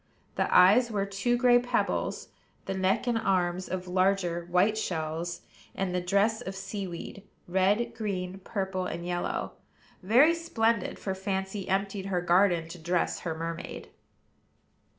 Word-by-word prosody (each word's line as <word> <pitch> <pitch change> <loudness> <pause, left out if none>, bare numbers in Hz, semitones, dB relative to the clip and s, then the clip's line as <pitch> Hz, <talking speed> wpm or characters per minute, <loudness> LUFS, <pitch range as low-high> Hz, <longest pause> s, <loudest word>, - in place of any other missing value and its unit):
The - - -1
eyes 210 +7 +6
were 200 -3 -1
two 200 +5 0
gray 245 0 +5
pebbles; 245 +1 -1 0.4
the - - -2
neck 190 +4 +1
and 240 -2 +1
arms 185 -3 0
of 185 0 -4
larger, 180 -2 +1
white 185 +5 +3
shells; 170 -3 -3 0.3
and 190 -2 -2
the 180 - 0
dress 200 +5 +1
of 190 -5 -6
sea 195 0 -5
weed, 175 +3 -8 0.3
red, 200 +6 +1
green, 195 -4 -4
purple, 190 -2 -3
and 170 +1 -5
yellow; 175 0 -2 0.5
very 250 - +5
splendid, 230 -10 0
for 190 - -3
Fancy 190 0 -3
emptied 195 0 -1
her 185 -2 0
garden 175 -1 +3
to 175 +1 -9
dress 175 +2 0
her 165 -2 -4
mermaid. 165 +1 -6
190 Hz, 145 wpm, -28 LUFS, 180-210 Hz, 0.5 s, eyes